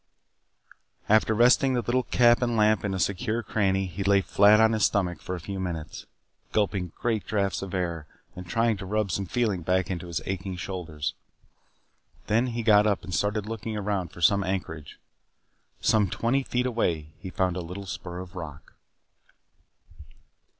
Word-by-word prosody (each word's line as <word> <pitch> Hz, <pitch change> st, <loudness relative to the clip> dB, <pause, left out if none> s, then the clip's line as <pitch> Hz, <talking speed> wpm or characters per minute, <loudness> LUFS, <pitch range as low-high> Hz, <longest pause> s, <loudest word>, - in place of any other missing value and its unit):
After 110 Hz, +1 st, +4 dB
resting 125 Hz, +3 st, +5 dB
the 120 Hz, -, 0 dB
little 120 Hz, +4 st, +1 dB
cap 120 Hz, -1 st, +4 dB
and 120 Hz, -2 st, 0 dB
lamp 105 Hz, -3 st, +3 dB
in 100 Hz, -2 st, -1 dB
a -, -, -3 dB
secure 105 Hz, +6 st, -1 dB
cranny 95 Hz, -2 st, +1 dB
he 95 Hz, +2 st, -5 dB
lay 100 Hz, 0 st, +4 dB
flat 100 Hz, +3 st, +5 dB
on 110 Hz, 0 st, +5 dB
his 110 Hz, -2 st, 0 dB
stomach 90 Hz, -3 st, +1 dB
for 90 Hz, -, -4 dB
a -, -, -6 dB
few 95 Hz, +3 st, -6 dB
minutes, 85 Hz, -4 st, -5 dB, 0.5 s
gulping 95 Hz, -4 st, 0 dB
great 115 Hz, -3 st, -1 dB
draughts 100 Hz, -2 st, 0 dB
of 95 Hz, 0 st, -5 dB
air 85 Hz, -4 st, -3 dB, 0.3 s
and 90 Hz, -1 st, -8 dB
trying 115 Hz, +3 st, +1 dB
to 95 Hz, -1 st, -7 dB
rub 105 Hz, -1 st, 0 dB
some 100 Hz, +2 st, -2 dB
feeling 110 Hz, -6 st, 0 dB
back 90 Hz, +2 st, 0 dB
into 90 Hz, -1 st, -4 dB
his 85 Hz, -3 st, -2 dB
aching 95 Hz, 0 st, -4 dB
shoulders. 90 Hz, -5 st, -4 dB, 1.1 s
Then 115 Hz, +4 st, +2 dB
he 120 Hz, -1 st, -3 dB
got 105 Hz, -1 st, +5 dB
up 100 Hz, -2 st, 0 dB
and 90 Hz, -, -7 dB
started 105 Hz, +2 st, 0 dB
looking 110 Hz, 0 st, -5 dB
about 100 Hz, -4 st, -2 dB
for 85 Hz, -, -12 dB
some 100 Hz, +4 st, +4 dB
anchorage. 85 Hz, -6 st, -4 dB, 0.8 s
Some 105 Hz, -4 st, +3 dB
twenty 120 Hz, +8 st, 0 dB
feet 125 Hz, -1 st, -1 dB
away, 85 Hz, -11 st, -1 dB
he 95 Hz, -, -7 dB
found 90 Hz, -1 st, 0 dB
a 90 Hz, -, -3 dB
little 90 Hz, +4 st, -7 dB
spur 90 Hz, -1 st, -6 dB
of 90 Hz, -1 st, -11 dB
rock. 80 Hz, -5 st, -9 dB
100 Hz, 170 wpm, -26 LUFS, 90-110 Hz, 1.1 s, resting